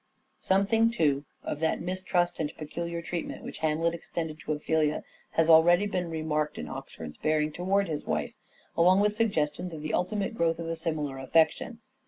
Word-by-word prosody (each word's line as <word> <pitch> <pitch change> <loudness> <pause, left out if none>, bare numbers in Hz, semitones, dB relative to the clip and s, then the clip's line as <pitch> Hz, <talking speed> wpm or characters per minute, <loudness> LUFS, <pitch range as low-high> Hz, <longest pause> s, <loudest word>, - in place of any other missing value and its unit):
Something 200 +4 +3
too, 150 -10 +1 0.2
of 150 - -4
that 160 0 +1
mistrust 180 0 -1
and 155 -2 -1
peculiar 170 +2 -4
treatment 170 -1 -4
which - - -7
Hamlet 160 +2 +1
extended 160 -2 -5
to 155 - -2
Ophelia 155 0 0 0.3
has 165 -1 +3
already 170 +4 +6
been 180 -4 -2
remarked 155 -2 -1
in 75 - -5
Oxford's 75 +1 -8
bearing 155 0 +1
towards 190 +4 +1
his 150 -2 -3
wife, - - -2 0.4
along 180 +3 +5
with 210 0 +3
suggestions 175 -6 0
of 150 - -8
the 155 - -3
ultimate 205 +4 0
growth 165 -5 +1
of 165 0 -5
a 165 - -1
similar 155 -4 -3
affection. 165 - +1
165 Hz, 170 wpm, -28 LUFS, 155-180 Hz, 0.4 s, already